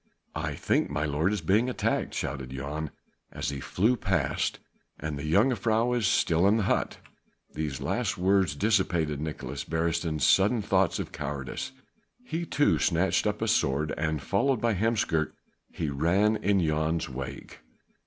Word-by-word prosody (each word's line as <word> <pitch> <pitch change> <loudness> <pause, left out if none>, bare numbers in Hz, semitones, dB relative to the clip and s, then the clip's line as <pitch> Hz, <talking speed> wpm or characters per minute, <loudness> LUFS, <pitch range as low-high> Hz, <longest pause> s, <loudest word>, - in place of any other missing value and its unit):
"I - - -3
think - - +1
my 75 +1 -1
lord 80 +5 +1
is 105 - -1
being 110 +6 +2
attacked," 125 - -1
shouted 65 -1 -3
Jan 70 +4 -4 0.4
as - - -3
he 70 -1 -4
flew 110 - +1
past, 95 - 0 0.4
"and 75 0 -3
the 70 - -5
jongejuffrouw 115 +3 +2
is 115 -5 +1
still 85 +2 +3
in 105 +3 +4
the 110 - +1
hut." - - 0 0.6
These 75 -3 -3
last - - -1
words 95 -4 +2
dissipated 85 -7 +1
Nicolaes 75 -3 -5
Beresteyn's 80 -2 0
sudden 105 +3 +4
thoughts 95 -3 +2
of - - -5
cowardice. 75 - -5 0.5
He 170 -4 -3
too 145 - +2
snatched 90 +2 +2
up - - -1
a - - 0
sword 70 +3 +1
and 75 -3 -2
followed 115 - +1
by 115 0 +1
Heemskerk 100 -6 0 0.3
he 80 -4 -3
ran 90 +10 +2
in 100 -1 +2
Jan's 80 +1 0
wake. 65 0 -7
85 Hz, 155 wpm, -28 LUFS, 75-105 Hz, 0.6 s, in